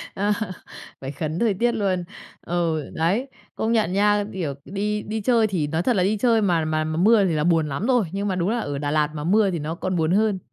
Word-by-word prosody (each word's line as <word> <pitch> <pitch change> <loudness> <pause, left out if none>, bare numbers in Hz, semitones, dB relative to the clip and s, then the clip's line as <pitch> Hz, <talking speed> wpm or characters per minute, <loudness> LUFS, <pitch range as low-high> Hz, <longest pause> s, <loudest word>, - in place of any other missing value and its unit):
Ờ. 205 +2 0 0.7
Phải 135 +1 -5
khấn 155 +3 -4
thời 225 -4 +2
tiết 240 +5 +1
luôn. 195 -5 -1 0.4
Ừ, 165 -3 -1
đấy, 195 +12 0 0.3
công 220 +1 -1
nhận 215 -6 +1
nha, 205 +1 +3
kiểu, 165 -7 -3
đi 210 +2 -2
đi 220 +1 -4
chơi 230 -1 +3
thì 170 -7 -1
nói 160 +3 -1
thật 245 - +2
là 180 - +2
đi 210 +3 +1
chơi 230 -1 +3
mà 170 -5 +1
mà 155 0 0
mà 155 +1 -3
mưa 205 +2 +5
thì 175 - 0
là 150 -1 0
buồn 165 -3 +2
lắm 165 - -2
rồi, 245 -6 +3
nhưng 200 +1 -2
mà 190 - -1
đúng 180 +2 0
là 235 +1 0
ở 145 -8 -3
Đà 145 0 -2
Lạt 150 -1 +2
mà 150 - -4
mưa 200 +3 +3
thì 170 - -2
nó 155 +3 -4
còn 185 +1 -3
buồn 160 0 +1
hơn. 210 -1 +2
185 Hz, 250 wpm, -23 LUFS, 160-210 Hz, 0.7 s, mưa